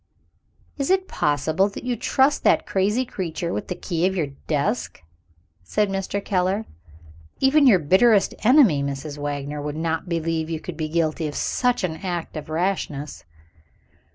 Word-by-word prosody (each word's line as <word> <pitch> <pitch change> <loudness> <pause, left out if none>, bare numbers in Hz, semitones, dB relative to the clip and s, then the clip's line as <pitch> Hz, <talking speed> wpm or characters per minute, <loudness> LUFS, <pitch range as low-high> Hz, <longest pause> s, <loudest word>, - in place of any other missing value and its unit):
"Is 275 - -1
it 380 0 +2
possible 155 +6 +1
that 200 - -9
you 250 -1 -1
trust 265 +5 +2
that - - +3
crazy 210 +7 +1
creature 175 -5 -4
with - - -4
the 180 - -3
key 175 0 -1
of 190 - -2
your 155 -6 -1 0.2
desk?" 160 +10 -1 0.6
said 205 - 0
Mr. 195 +1 -3
Keller. 190 +3 0 0.7
"Even 280 +1 +5
your 215 -7 +7
bitterest 195 +7 +4
enemy, 230 - +5
Mrs. 140 +1 -4
Wagner, 145 0 -4
would 150 +1 -4
not 160 +2 -2
believe 165 -1 -1
you 160 -1 -3
could 175 +1 -7
be 155 -1 -3
guilty 160 -1 0
of 145 - -6
such 250 -4 0
an 160 -3 -2
act 175 -3 -4
of 155 0 -6
rashness." 155 - -2
175 Hz, 155 wpm, -23 LUFS, 155-205 Hz, 0.7 s, your